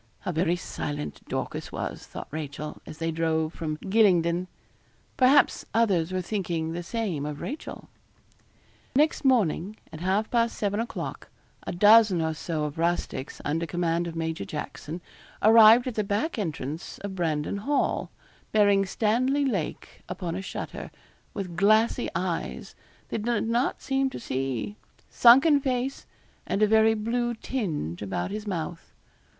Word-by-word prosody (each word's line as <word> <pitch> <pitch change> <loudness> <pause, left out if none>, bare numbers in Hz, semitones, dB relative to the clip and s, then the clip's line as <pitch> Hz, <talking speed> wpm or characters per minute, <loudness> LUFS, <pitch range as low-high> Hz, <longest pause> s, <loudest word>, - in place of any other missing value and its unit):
How - - -2
very 170 +1 +1
silent 150 -4 -5
Dorcas - - -4
was, - - -5
thought - - -8
Rachel, 150 0 -6
as 155 - -9
they 165 0 -1
drove 160 0 0
from 155 -2 -4
Gylingden. 180 -4 +3 0.7
Perhaps 270 +2 +4
others 190 -7 +2
were 185 0 -1
thinking 170 -5 -2
the 170 +1 -4
same 185 -5 -3
of 150 0 -4
Rachel. 295 +4 -6 1.1
Next 305 +3 +3
morning, 215 - +2 0.2
at 155 - -7
half 190 +5 0
past 235 -1 +1
seven 205 0 -1
o'clock, 230 - -5 0.4
a - - -1
dozen 205 0 +6
or 160 0 0
so 155 0 -3
of 150 +2 -4
rustics, 170 -5 -2
under 165 +3 -1
command 170 +1 0
of 165 - -6
Major 160 0 -2
Jackson, 155 +2 -6 0.4
arrived 225 +2 +8
at 255 - -3
the 215 - 0
back 210 +8 -1
entrance 160 -3 -4
of 200 -1 -6
Brandon 160 -1 -1
Hall, 280 +8 0 0.4
bearing 200 -2 +4
Stanley 255 +8 +1
Lake 195 - -3
upon 175 -3 -4
a 185 - -3
shutter, 195 - -6 0.5
with 185 -4 -4
glassy 215 +5 +3
eyes, - - -3 0.4
that 225 - -2
did 235 0 0
not 235 +3 0
seem 270 0 +1
to - - -7
see, 135 - -3 0.3
sunken 270 +5 +7
face, 260 0 -2 0.4
and 205 - +1
a - - +6
very 220 +1 +5
blue 240 +2 -1
tinge 165 - -3
about 95 - -3
his 210 +1 -5
mouth. 170 -3 -5
190 Hz, 145 wpm, -27 LUFS, 165-225 Hz, 1.1 s, arrived